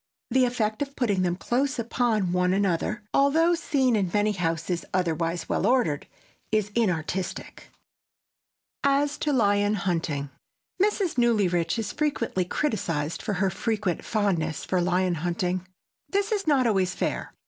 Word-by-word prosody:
The 260 -1 +4
effect 220 -2 -1
of 280 -1 -3
putting 205 -7 +1
them 175 -1 +1
close 260 +8 -1
upon 230 -5 0
one 180 0 +2
another, 200 +2 0
though 320 +5 +4
seen 270 -7 +1
in 195 -4 +1
many 210 +2 +2
houses 170 -2 -2
otherwise 170 -1 -1
well 195 - 0
ordered, 235 - +1 0.4
is 215 -1 +1
inartistic. 185 -4 -2 1.1
[Sidenote: 280 0 +4
AS - - -7
TO 300 - 0
LION 205 -5 +3
HUNTING] 165 -7 -2 0.5
Mrs. 395 - +1
Newlyrich 195 -7 +2
is 215 -2 -3
frequently 240 -11 -1
criticized 170 - -2
for 210 - -2
her 190 0 +1
frequent 210 -4 -2
fondness 180 -8 -1
for 185 -1 +1
lion 180 +1 +1
hunting. 180 +1 -1 0.4
This 400 +1 0
is 405 -5 -1
not 275 -4 +4
always 190 -5 +1
fair. - - -3
205 Hz, 140 wpm, -26 LUFS, 180-245 Hz, 1.1 s, The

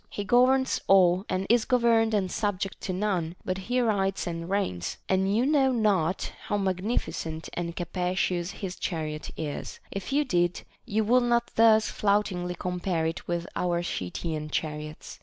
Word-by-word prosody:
He 205 - -4
governs 255 +5 +3
all, 185 0 +5
and 185 +1 -1
is 235 0 +4
governed 230 -3 +3
and 190 -3 0
subject 200 -3 -2
to 190 - -3
none, 185 -4 -1
but 185 0 -2
he 250 +1 +2
rides 195 -4 0
and 165 0 -4
reigns; 90 - -1
and 190 +1 +2
you 245 - +3
know 275 -2 +3
not 195 -7 +1
how 205 - 0
magnificent 185 -4 -2
and 170 -1 -3
capacious 180 0 -1
his 190 -2 -6
chariot 155 -3 -3
is; 150 -3 -5
if 195 +4 -5
you 290 +2 +2
did, 175 -6 +1 0.2
you 220 +2 +1
would 245 +4 +4
not 235 -1 +1
thus 220 -1 +5
floutingly 195 -4 0
compare 180 -2 -1
it 165 +1 -3
with 170 -1 -1
our 175 -1 0
Scythian 155 - -3
chariots. 150 0 -5
190 Hz, 160 wpm, -27 LUFS, 175-215 Hz, 0.2 s, all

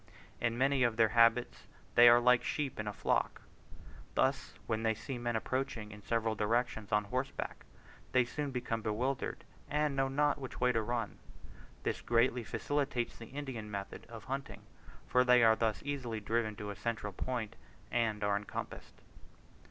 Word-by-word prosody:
In 115 0 0
many 135 +1 +3
of 120 -3 +2
their 110 -1 +5
habits 115 +1 +3 0.3
they 120 0 +9
are 120 0 +7
like 125 0 +4
sheep 145 -7 -2
in 105 - -3
a - - -1
flock. - - 0 0.7
Thus - - +1
when 110 0 -1
they 110 -1 +1
see 125 +3 -5
men 120 -1 -1
approaching 110 -2 -2
in 105 0 -10
several 115 +1 0
directions 110 -1 0
on 105 0 +3
horseback, 130 +6 -4 0.5
they 125 -1 +4
soon 145 +3 -3
become 120 -3 -2
bewildered, 120 +5 -2 0.3
and 150 -1 +1
know 135 0 +2
not 145 +2 +1
which 130 -2 -7
way 125 0 +4
to 115 -2 +1
run. 115 -1 -3 0.6
This - - -1
greatly 120 +1 +2
facilitates 140 -1 -1
the 115 - -8
Indian 130 -6 -6
method 100 +1 -6
of 115 -2 -9
hunting, 135 +1 -5 0.4
for 125 - +4
they 125 -1 +6
are 110 -1 +7
thus 110 -1 -1
easily 130 -6 -3
driven 110 0 -1
to 105 0 -5
a - - -7
central 110 -3 -3
point, 115 0 -3 0.4
and 110 -3 0
are 100 0 +2
encompassed. 100 - -7
120 Hz, 165 wpm, -33 LUFS, 110-130 Hz, 0.7 s, they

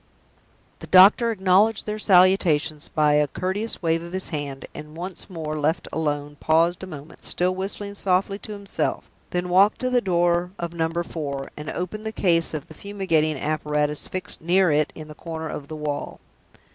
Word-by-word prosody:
The - - -9
doctor 200 +6 +7
acknowledged 205 +1 +3
their 215 0 -3
salutations 180 -6 +3
by 150 -2 +2
a 150 0 +3
courteous 190 +8 -2
wave 165 0 +1
of 170 +1 -9
his 185 0 -1
hand; 145 -4 -5
and, 150 +1 -10
once 180 +3 -7
more 155 -4 -4
left 155 +3 0
alone, 145 -2 -2
paused 165 +2 +2
a 190 - -6
moment, 155 -2 -11
still 180 +1 +1
whistling 200 +2 -4
softly 195 0 0
to 210 - -8
himself, 200 -1 -2 0.3
then 180 0 -2
walked 190 +4 +4
to 255 0 0
the 245 -1 +3
door 175 -1 +1
of 170 -1 -4
Number 165 +1 -1
Four, 140 -5 -5
and 150 0 -7
opened 215 +5 -4
the - - -2
case 170 -6 +2
of 150 - -6
the - - -12
fumigating 165 -6 0
apparatus 150 0 -1
fixed 185 - -4
near 180 +1 +3
it 150 0 +2
in 155 -1 -9
the 155 - -9
corner 160 0 -6
of 140 - -6
the 155 - -7
wall. 150 -1 -4
170 Hz, 180 wpm, -24 LUFS, 155-190 Hz, 0.3 s, doctor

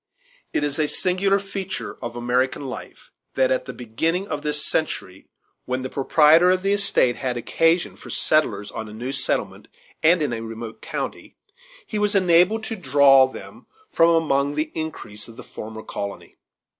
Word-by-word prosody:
It - - 0
is 145 +1 -1
a 155 - +2
singular 190 +4 +2
feature 195 -1 -5
in 120 - -4
American 125 +3 0
life 130 - -9 0.2
that - - +2
at - - 0
the - - -6
beginning 160 - -2
of 145 - -3
this 150 0 0
century, 95 - -2 0.4
when 130 +1 -2
the 130 - -5
proprietor 155 +5 +5
of 185 0 +2
the 195 +1 +2
estate 195 -11 +3
had 125 -2 -2
occasion 165 +8 +1
for - - -13
settlers 105 -10 0
on 110 -1 -6
a - - -10
new 120 +4 -5
settlement 135 - -2 0.3
and 165 0 +4
in 140 - -1
a 115 - -4
remote 115 0 -8
county, - - -6 0.5
he 215 - -3
was 210 0 +1
enabled 185 +4 +4
to 225 - -4
draw 135 -5 +5
them 130 - -12 0.2
from 165 - +4
among 145 -4 +1
the 155 +1 -2
increase 155 -10 -5
of 115 0 -14
the - - -9
former 110 0 -9
colony. 100 0 -7
150 Hz, 170 wpm, -23 LUFS, 125-180 Hz, 0.5 s, proprietor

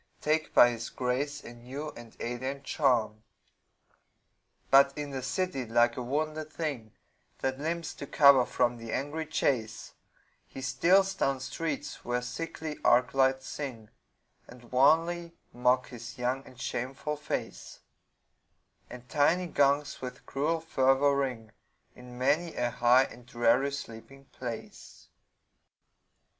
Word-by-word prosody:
Take 155 +1 0
by 120 - +8
his 115 0 -5
grace 140 +4 -2
a 120 - -9
new 130 +6 -7
and 120 -4 -13
alien 130 +3 -4
charm. 120 -7 +1 1.5
But 140 +1 +6
in 145 -1 -4
the 135 -1 -4
city, 180 +1 -2
like 120 +1 +3
a - - -4
wounded 155 +4 -2
thing 140 -10 -4 0.5
That 130 0 -1
limps 165 +3 -3
to 140 - -7
cover 140 -3 +6
from 120 -1 +1
the 115 -1 -7
angry 150 +4 -3
chase, 110 -8 -1 0.5
He - - -10
steals 185 +9 +3
down 135 -1 0
streets 145 +3 -4
where 125 0 -1
sickly 155 +4 -5
arc 125 +2 +4
lights 130 0 +2
sing, 120 -7 -6 0.6
And 120 -1 -15
wanly 165 +6 +3 0.2
mock 125 +1 +2
his 120 0 -9
young 125 +2 -1
and 125 - -15
shameful 135 +6 -3
face; 60 - -5 1.1
And 125 0 -11
tiny 160 +8 +2
gongs 145 -2 +1
with 125 -1 -7
cruel 160 +4 -1
fervor 135 -2 +3
ring 125 -6 -2 0.4
In 125 0 -12
many 155 +6 +1
a 120 0 0
high 120 +2 +5
and 125 -2 -10
dreary 120 +3 +2
sleeping 135 +1 -9
place. 120 -3 -8
130 Hz, 130 wpm, -29 LUFS, 120-150 Hz, 1.5 s, by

